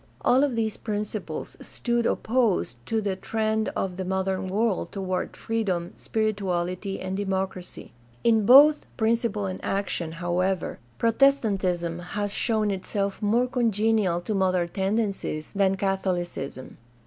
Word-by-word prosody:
All 260 +3 +4
of 275 -4 +1
these 220 -2 -1
principles 210 -1 -4
stood 235 -1 -1
opposed 215 - 0
to 225 -1 0
the 200 -2 -1
trend 220 +2 -1
of 185 -2 -2
the 190 - -2
modern 190 0 -1
world 210 +1 0
toward 185 -2 -3
freedom, 195 -7 -2
spirituality, 195 -3 -2
and 185 0 -3
democracy. 190 -2 -3 0.3
In 225 -2 +4
both 285 +7 +7
principle 225 -2 +1
and 185 -1 -5
action, 190 -4 -2
however, 175 +2 -1 0.2
Protestantism 200 -9 +2
has 205 +3 -3
shown 215 -3 +1
itself 195 +1 -2
more 225 +4 +3
congenial 220 -7 +1
to 195 +5 -3
modern 185 -3 +1
tendencies 195 -5 -2
than 195 -1 +2
Catholicism. 180 -8 -3
200 Hz, 125 wpm, -26 LUFS, 185-220 Hz, 0.3 s, both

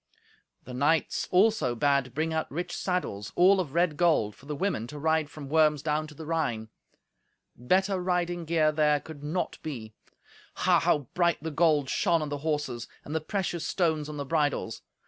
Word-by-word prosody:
The 125 - -9
knights 145 +5 +1
also 185 - +3
bade 140 -1 +1
bring 160 +2 -1
out 160 - -1
rich 175 +5 -4
saddles, 140 - -2
all 190 +2 +5
of 160 -5 -3
red 170 -3 +2
gold, 155 -12 +2
for 140 - -17
the 150 - -3
women 160 - -1
to 150 - -8
ride 160 0 +1
from 145 -2 -9
Worms 150 -1 +3
down 155 0 0
to 150 - -13
the 160 - -8
Rhine. 120 -9 -2 0.9
Better 185 - +1
riding 175 -1 -1
gear 155 -1 +2
there 150 -1 +2
could 145 -1 -11
not 165 +5 -2
be. 115 -8 -6 0.6
Ha! - - +3
how 145 -4 +1
bright 170 -4 +1
the 160 - -3
gold 150 -3 +3
shone 165 +4 +1
on 150 - -4
the 145 0 -3
horses, 145 -6 -2 0.2
and 150 - -6
the 160 - 0
precious 175 -1 -2
stones 160 -5 0
on 150 - -6
the 140 - -3
bridles! 145 -7 -1
155 Hz, 185 wpm, -28 LUFS, 140-170 Hz, 0.9 s, all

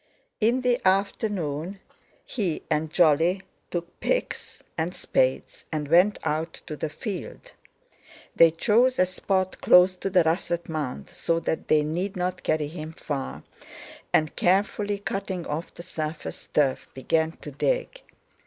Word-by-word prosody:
In 235 +4 +3
the 250 -1 +2
afternoon 190 -3 0 0.5
he 185 -9 -2
and 155 0 +1
Jolly 170 +3 +3 0.3
took 175 0 -5
picks - - -2
and 170 +2 -2
spades 130 0 0
and 150 -2 -2
went 180 +6 +5
out 160 +2 -1
to 155 - -5
the 155 - -3
field. 210 - -6 0.8
They 165 - +8
chose 235 +10 +3
a 185 - +5
spot 185 +1 -1
close 180 +1 +6
to 195 - -2
the 180 -2 +4
russet 170 +1 0
mound, 150 -5 -4
so 170 -1 0
that 160 - -2
they 150 -1 +4
need 175 +6 -2
not 180 0 -2
carry 155 -2 0
him 155 0 -7
far, 140 -4 -5 0.7
and, 155 -1 +2
carefully 205 +2 +1
cutting 195 -3 -4
off 155 +4 -4
the 170 - -10
surface 155 -2 -5
turf, 140 -3 +1
began 160 +5 +1
to 150 - -10
dig. - - -1
175 Hz, 140 wpm, -26 LUFS, 155-195 Hz, 0.8 s, They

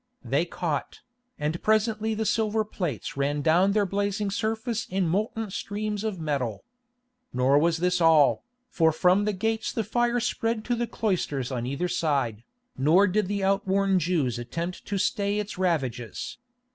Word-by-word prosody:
They 145 +5 +1
caught, 165 -4 -3 0.4
and 150 +3 -2
presently 220 0 +1
the 220 +1 -1
silver 220 0 +1
plates 175 - -4
ran 145 +1 -1
down 180 +6 +4
their 210 -1 +3
blazing 200 +1 -1
surface 225 +2 -2
in 185 -1 0
molten 210 +4 -1
streams 210 +1 -3
of 215 -5 -3
metal. 135 -9 -2 0.7
Nor 130 +3 +4
was 165 +1 +2
this 180 +1 +1
all, 160 -4 +5 0.3
for 160 -2 +3
from 180 +5 +3
the 210 - +1
gates 220 +3 -1
the 225 - -1
fire 240 +2 +1
spread 225 -2 -1
to 245 - 0
the 240 0 -1
cloisters 150 - -1
on 120 -1 -2
either 140 +7 -1
side, 145 -11 0 0.3
nor 160 +9 +4
did 205 0 +1
the 200 0 -2
outworn 195 0 +2
Jews 150 -8 0
attempt 165 +9 -5
to 200 - -1
stay 200 0 0
its 210 -2 -4
ravages. 135 - -2
185 Hz, 160 wpm, -26 LUFS, 155-215 Hz, 0.7 s, all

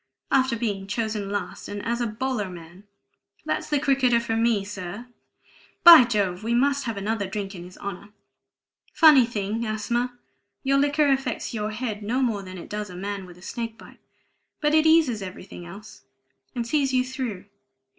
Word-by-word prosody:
"After 260 -2 +3
being 205 -4 -3
chosen 215 -1 -2
last, 205 0 -4
and 205 0 -6
as 235 +2 -1
a 240 - 0
bowler 220 -2 -2
man! 175 +2 -12 0.6
That's - - -2
the 295 - +2
cricketer 265 -4 +3
for 230 -1 -2
me, 225 -3 +2
sir; 200 +2 -7 0.8
by 335 -7 +11
Jove, 200 -5 -1
we 235 +2 0
must 280 +3 +2
have 230 -3 -3
another 205 0 -2
drink 195 0 -5
in 175 -2 -8
his 180 - -13
honor! 200 0 -7 0.9
Funny 295 -7 +7
thing, 215 0 -3
asthma; 235 +3 -2 0.5
your 275 +1 +3
liquor 290 +2 +3
affects 265 -4 -2
your 210 -2 -2
head 215 -1 -4
no 245 +6 0
more 220 -5 0
than 185 -1 -9
it 175 - -9
does 210 -1 -5
a 180 - -9
man 195 0 -5
with 175 -1 -14
a 180 - -16
snake 230 +2 -5
bite; - - -15 0.6
but 300 0 +1
it 315 0 +5
eases 310 -9 +4
everything 185 -2 -9
else, 210 +4 -12 0.5
and 240 -1 -2
sees 275 +2 +1
you 255 0 +2
through. 255 -8 -5
225 Hz, 175 wpm, -25 LUFS, 200-255 Hz, 0.9 s, by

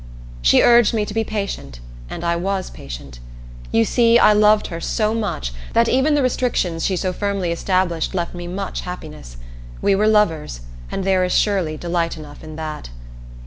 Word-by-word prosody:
She - - +5
urged 235 -1 +5
me 210 -1 +1
to 205 - -7
be 225 +1 +1
patient, 200 - -5 0.3
and - - -6
I 170 0 +1
was 190 +2 -2
patient. - - -9 0.5
You 115 - +3
see, 235 -1 +4
I 215 - +6
loved 210 0 +4
her 165 - -5
so 215 +3 0
much 200 - -3 0.2
that 230 0 +4
even 265 +5 +3
the 285 - +2
restrictions 225 -10 0
she 190 - +1
so 185 0 -1
firmly 200 -3 -2
established 180 0 0
left 175 -2 -2
me 175 -1 -7
much 190 +2 -4
happiness. 150 - -9 0.4
We 200 - +2
were 210 +2 +2
lovers, 165 - +1 0.3
and - - -3
there 190 -1 +2
is 180 - 0
surely 185 -7 +1
delight 170 0 -2
enough 150 -1 -11
in 155 -1 -9
that. 155 - -6
185 Hz, 180 wpm, -20 LUFS, 160-210 Hz, 0.5 s, I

